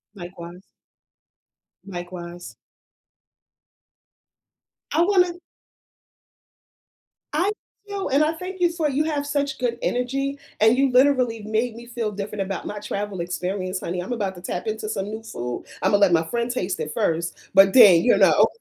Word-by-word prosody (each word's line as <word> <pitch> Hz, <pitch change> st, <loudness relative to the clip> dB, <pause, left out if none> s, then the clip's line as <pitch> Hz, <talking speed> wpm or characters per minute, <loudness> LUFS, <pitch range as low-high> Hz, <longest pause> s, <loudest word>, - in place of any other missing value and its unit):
Likewise. 175 Hz, 0 st, -10 dB, 1.2 s
Likewise. 175 Hz, -2 st, -8 dB, 2.4 s
I 320 Hz, -, +2 dB
wanna 360 Hz, -1 st, +3 dB, 2.0 s
I 360 Hz, +7 st, +2 dB, 0.4 s
feel, 400 Hz, -1 st, -3 dB
and 280 Hz, +3 st, +3 dB
I 310 Hz, -, +1 dB
thank 365 Hz, +3 st, -7 dB
you 350 Hz, -1 st, +4 dB
for 330 Hz, -3 st, -1 dB
you 285 Hz, +3 st, +1 dB
have 295 Hz, -2 st, -1 dB
such 285 Hz, -1 st, -1 dB
good 240 Hz, -2 st, -1 dB
energy, 275 Hz, +3 st, -1 dB, 0.2 s
and 220 Hz, +3 st, +5 dB
you 270 Hz, -1 st, +3 dB
literally 250 Hz, -4 st, +3 dB
made 220 Hz, +2 st, -1 dB
me 235 Hz, +1 st, -11 dB
feel 235 Hz, -3 st, -3 dB
different 200 Hz, 0 st, -4 dB
about 195 Hz, 0 st, -5 dB
my 210 Hz, -, -5 dB
travel 205 Hz, -2 st, -4 dB
experience, 185 Hz, +2 st, -3 dB
honey, 175 Hz, 0 st, -3 dB
I'm 190 Hz, -, -4 dB
about 200 Hz, -5 st, -2 dB
to 175 Hz, -, -11 dB
tap 180 Hz, +3 st, -4 dB
into 215 Hz, 0 st, -3 dB
some 195 Hz, -2 st, -2 dB
new 220 Hz, +1 st, -6 dB
food, 120 Hz, -, -5 dB, 0.2 s
I'm -, -, +2 dB
gonna 205 Hz, 0 st, +3 dB
let 190 Hz, -3 st, +5 dB
my 165 Hz, -1 st, +4 dB
friend 235 Hz, +7 st, -2 dB
taste 185 Hz, -8 st, -2 dB
it 155 Hz, -1 st, -4 dB
first, 170 Hz, +1 st, -2 dB
but 195 Hz, 0 st, +7 dB
then, 200 Hz, -10 st, +8 dB
you 245 Hz, -, +4 dB
know. -, -, +5 dB
220 Hz, 155 wpm, -23 LUFS, 185-275 Hz, 2.4 s, then